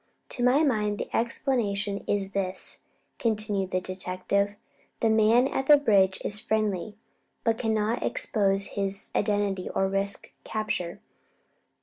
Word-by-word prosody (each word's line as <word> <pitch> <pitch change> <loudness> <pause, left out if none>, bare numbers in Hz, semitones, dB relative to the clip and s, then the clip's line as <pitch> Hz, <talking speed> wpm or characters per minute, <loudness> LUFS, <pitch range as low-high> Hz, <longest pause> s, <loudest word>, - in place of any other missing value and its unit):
"To 245 - -3
my 260 +5 +5
mind, 210 -7 +1
the - - -4
explanation 210 -5 0
is 200 -1 0
this," 190 -1 -3 0.4
continued 210 -4 0
the 185 - 0
detective. 185 +2 -1 0.4
"The 225 - +3
man 220 +4 +5
at 265 - -2
the 295 - +9
bridge 195 -8 +3
is 210 - -2
friendly, 215 -2 -1 0.5
but 230 -1 +1
cannot 220 0 0
expose 195 -2 +1
his 200 0 -2
identity 205 -3 0
or 195 - +1
risk 195 +1 -2
capture. 215 -5 -3
205 Hz, 125 wpm, -27 LUFS, 195-220 Hz, 0.5 s, the